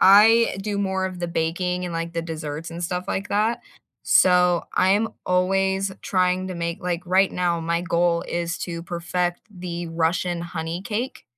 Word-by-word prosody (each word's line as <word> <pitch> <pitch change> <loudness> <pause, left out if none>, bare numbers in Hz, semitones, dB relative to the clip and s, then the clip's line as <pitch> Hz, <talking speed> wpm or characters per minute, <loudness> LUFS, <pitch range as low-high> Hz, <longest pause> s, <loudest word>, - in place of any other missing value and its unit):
I 215 +3 +7
do 205 0 -2
more 190 -1 0
of 180 -1 -7
the 175 - -2
baking, 180 +2 -1
and, 175 - -4
like, 165 0 -3
the 165 0 -2
desserts, 160 0 -5
and 170 +1 -6
stuff 180 +1 -2
like 195 0 -2
that. 215 +3 +1 0.4
So, 180 -1 +4
I'm 205 +4 +3 0.2
always 190 +1 +1
trying 185 0 +1
to 185 - -5
make 170 0 -3
like, 180 -1 -2
right 190 +2 +4
now, 175 -2 0
my 170 +1 0
goal 170 -1 +1
is 170 0 -2
to 170 -1 -4
perfect 175 +1 -2
the 175 -3 -5
Russian 170 +1 0
honey 170 +1 -4
cake. 230 +6 -4
180 Hz, 170 wpm, -23 LUFS, 170-190 Hz, 0.4 s, I